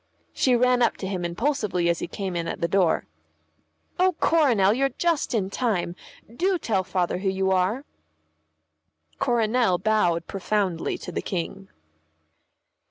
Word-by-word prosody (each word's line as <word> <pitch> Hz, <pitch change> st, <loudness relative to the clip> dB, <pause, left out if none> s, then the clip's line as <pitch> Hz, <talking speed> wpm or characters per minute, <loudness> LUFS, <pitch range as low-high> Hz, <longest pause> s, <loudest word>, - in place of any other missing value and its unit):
She 255 Hz, -2 st, +3 dB
ran 250 Hz, +1 st, +3 dB
up 235 Hz, -, +2 dB
to 190 Hz, -, -5 dB
him 185 Hz, -2 st, -3 dB
impulsively 185 Hz, -1 st, -1 dB
as 170 Hz, 0 st, +1 dB
he -, -, -4 dB
came 190 Hz, -1 st, -4 dB
in 170 Hz, -1 st, -2 dB
at -, -, -4 dB
the 170 Hz, -, 0 dB
door. 180 Hz, -1 st, +2 dB, 0.9 s
"Oh, 370 Hz, -1 st, +3 dB
Coronel, 240 Hz, -12 st, +4 dB
you're 270 Hz, +3 st, +1 dB
just 330 Hz, -5 st, 0 dB
in 195 Hz, -3 st, -1 dB
time; 200 Hz, -9 st, -1 dB, 0.4 s
do 370 Hz, +6 st, +1 dB
tell 205 Hz, -, 0 dB
Father 180 Hz, -1 st, -1 dB
who 195 Hz, 0 st, 0 dB
you 190 Hz, 0 st, 0 dB
are." 190 Hz, +9 st, +1 dB, 1.3 s
Coronel 230 Hz, -4 st, +2 dB
bowed 175 Hz, -5 st, +1 dB
profoundly 195 Hz, -3 st, -1 dB
to -, -, -8 dB
the -, -, -3 dB
King. 190 Hz, +2 st, -5 dB
195 Hz, 145 wpm, -25 LUFS, 180-245 Hz, 1.3 s, Coronel